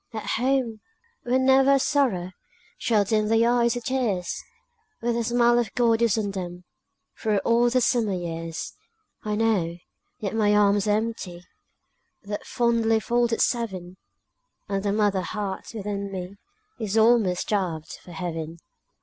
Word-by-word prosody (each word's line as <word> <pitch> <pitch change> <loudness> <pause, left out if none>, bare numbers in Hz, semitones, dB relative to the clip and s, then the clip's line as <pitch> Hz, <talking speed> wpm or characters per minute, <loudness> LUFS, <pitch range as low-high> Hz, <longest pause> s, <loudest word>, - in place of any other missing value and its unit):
At 220 - -4
home, 255 -4 +1 0.4
where 245 +1 +1
never 265 +1 +5
a 275 - +4
sorrow 240 -12 +1 0.5
Shall 215 -3 +2
dim 215 +1 +1
their 225 +2 +3
eyes 235 0 +2
with 245 - -4
tears! 225 -10 -1 0.6
Where 240 +1 0
the 235 0 0
smile 240 +1 +3
of 230 -5 -1
God 230 -2 +3
is 230 -2 +3
on 205 -2 -1
them 180 -2 -6 0.6
Through 215 -2 +1
all 235 +1 +4
the 255 +1 +2
summer 230 -4 +2
years! 165 -1 -5 0.5
I 210 -1 -1
know, 205 -7 +1 0.4
yet 200 -2 -4
my 210 -2 +3
arms 205 0 +3
are 210 0 +3
empty, 210 -6 -5 0.8
That 205 +3 -6
fondly 230 -3 +2
folded 235 +1 +1
seven, 190 -7 -1 0.7
And 195 -1 -1
the 200 0 0
mother 205 -2 +1
heart 200 0 -4
within 200 -1 -4
me 190 +1 -6 0.4
Is 220 -1 -2
almost 220 -5 +4
starved 180 -7 -2
for 180 - -13
heaven. 165 -2 -5
215 Hz, 150 wpm, -25 LUFS, 190-235 Hz, 0.8 s, never